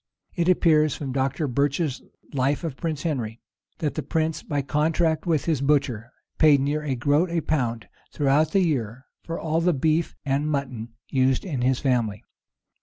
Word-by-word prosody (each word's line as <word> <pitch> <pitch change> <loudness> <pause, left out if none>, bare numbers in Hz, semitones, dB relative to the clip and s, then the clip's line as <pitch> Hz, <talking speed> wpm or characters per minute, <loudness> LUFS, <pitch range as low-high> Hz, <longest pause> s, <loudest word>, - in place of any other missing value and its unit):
It 175 0 0
appears 155 -4 +4
from 140 -3 -5
Dr. 135 +3 -1
Birch's 140 +2 0 0.3
life 140 +4 0
of 160 -5 -3
Prince 155 -1 -3
Henry,[*] 120 -8 -2 0.4
that 150 -3 -2
that - - -5
prince, 160 -1 0
by 145 -2 -2
contract 160 +3 +1
with 160 -4 +1
his 155 -5 0
butcher, 135 -5 +1 0.3
paid 150 -3 +6
near 145 +3 0
a 145 -3 -2
groat 145 +8 +2
a 170 0 0
pound 120 -8 -1 0.2
throughout 145 +2 +2
the 195 - +3
year 130 - -1 0.2
for 165 - -5
all 160 +1 0
the 175 +1 +3
beef 155 +4 0
and 140 +2 0
mutton 125 -6 -3 0.2
used 130 +2 +2
in 145 -9 -3
his 130 0 +2
family. 115 -7 0
145 Hz, 170 wpm, -25 LUFS, 130-160 Hz, 0.4 s, paid